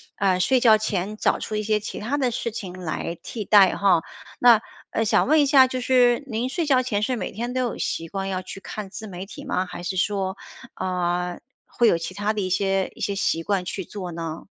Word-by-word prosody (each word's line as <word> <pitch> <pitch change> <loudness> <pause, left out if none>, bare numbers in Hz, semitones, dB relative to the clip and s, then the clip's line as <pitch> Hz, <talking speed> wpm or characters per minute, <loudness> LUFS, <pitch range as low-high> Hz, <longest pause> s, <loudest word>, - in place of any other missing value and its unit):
啊， 185 -2 +2
睡 260 +7 +3
觉 225 -3 +6
前 210 -1 -2
找 - - +1
出 215 - -4
一 210 - -1
些 210 0 +1
其 210 - -7
他 245 +7 -2
的 260 -3 +1
事 235 0 -3
情 195 -5 -6
来 170 -1 -4
替 215 -4 -5
代 195 -3 +6
哈。 190 -4 +4 0.4
那， 235 -3 +7 0.3
呃， 225 - 0
想 215 - +3
问 310 +2 +5
一 - - +4
下 270 -2 +7
就 255 0 -3
是 250 +1 +3
您 240 +1 -2
睡 335 +4 -1
觉 265 -4 +4
前 210 -5 -1
是 255 +4 0
每 230 - -4
天 240 +3 -4
都 255 - 0
有 245 -3 -2
习 165 0 -3
惯 195 +1 -3
要 185 -1 -2
去 185 +1 -9
看 205 0 -7
自 220 +3 -8
媒 185 -1 -7
体 195 - -10
吗？ 185 - -1
还 180 -1 -8
是 180 +2 -3
说， 190 0 0 0.4
呃， 180 -1 -2 0.3
会 235 - +2
有 170 - +4
其 165 +2 -6
他 205 +2 -1
的 210 - -2
一 185 - -2
些 195 +1 0
一 - - -16
些 200 - -1
习 165 -5 0
惯 195 -1 0
去 185 +1 -5
做 185 -2 -6
呢？ 165 -1 -5
205 Hz, 250 characters per minute, -24 LUFS, 185-235 Hz, 0.4 s, 那